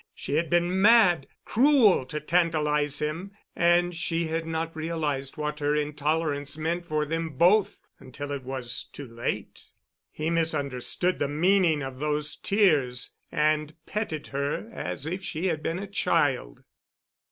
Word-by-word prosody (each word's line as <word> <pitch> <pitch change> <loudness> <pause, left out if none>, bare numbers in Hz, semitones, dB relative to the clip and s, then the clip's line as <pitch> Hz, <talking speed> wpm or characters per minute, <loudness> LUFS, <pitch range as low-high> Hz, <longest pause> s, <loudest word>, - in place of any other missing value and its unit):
She - - -5
had 160 +2 +1
been 175 +3 +2
mad—cruel 215 - +4
to 150 - -4
tantalize 150 -3 +1
him—and 175 +1 0
she 165 0 -1
had 165 0 -2
not 165 0 -3
realized 155 -4 -2
what 150 0 -3
her 145 0 +1
intolerance 150 0 -1
meant 170 +2 -2
for 155 -1 0
them 165 -2 -3
both 190 +6 +4 0.2
until 145 +3 -7
it 140 -1 -3
was 130 -2 -4
too 140 - -8
late. 115 +1 -5 0.4
He 155 +2 -3
misunderstood 160 +1 0
the 145 - +1
meaning 165 0 +2
of 130 -1 -7
those 150 0 -1
tears 150 - +1 0.2
and 155 0 +1
petted 210 -8 -3
her 140 +10 -3
as 140 - -5
if 180 +4 -3
she 175 -1 -3
had 155 - -2
been 165 +1 -2
a 200 - -4
child. - - 0
155 Hz, 140 wpm, -27 LUFS, 145-175 Hz, 0.4 s, mad—cruel